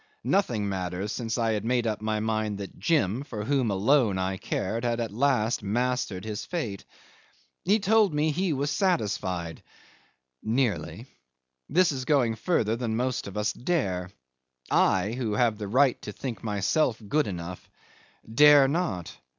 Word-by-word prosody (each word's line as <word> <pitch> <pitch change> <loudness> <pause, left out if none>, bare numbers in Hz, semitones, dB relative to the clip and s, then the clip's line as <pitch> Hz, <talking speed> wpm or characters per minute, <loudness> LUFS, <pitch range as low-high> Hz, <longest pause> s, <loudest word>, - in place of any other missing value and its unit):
Nothing 120 - +1
mattered, 95 +1 -3
since 115 +1 -3
I 115 -1 +1
had 105 -2 -1
made 120 +1 +1
up 110 -2 -2
my 110 0 -1
mind 110 -1 -1
that 100 -1 -8
Jim, 130 - +1
for 105 -7 -6
whom 135 -3 +1
alone 105 +1 +3
I 95 0 -1
cared, 110 +5 -3
had 120 -1 0
at 115 -3 -2
last 120 -1 +1
mastered 110 -2 -1
his 105 -2 -4
fate. 115 - -4 0.8
He 195 - +3
had 215 -2 +2
told 215 -1 +4
me 150 +1 +1
he 180 +3 0
was 145 0 -1
satisfied... 100 - -1 0.8
nearly. 110 - -1 0.6
This 175 +3 +4
is 130 -2 -4
going 130 -6 +2
further 110 - 0
than 115 -2 -2
most 125 -1 -1
of 100 +1 -7
us 105 0 0
dare. 95 - -1 0.6
I 95 +2 +3
who 120 -3 -2
have 110 -1 +1
the 105 - -4
right 130 +4 +3
to 105 - -6
think 115 -2 -6
myself 110 +5 +1
good 150 +6 +1
enough 90 -1 -7 0.6
dare 145 +4 +7
not. 145 - -2
115 Hz, 160 wpm, -27 LUFS, 105-140 Hz, 0.8 s, dare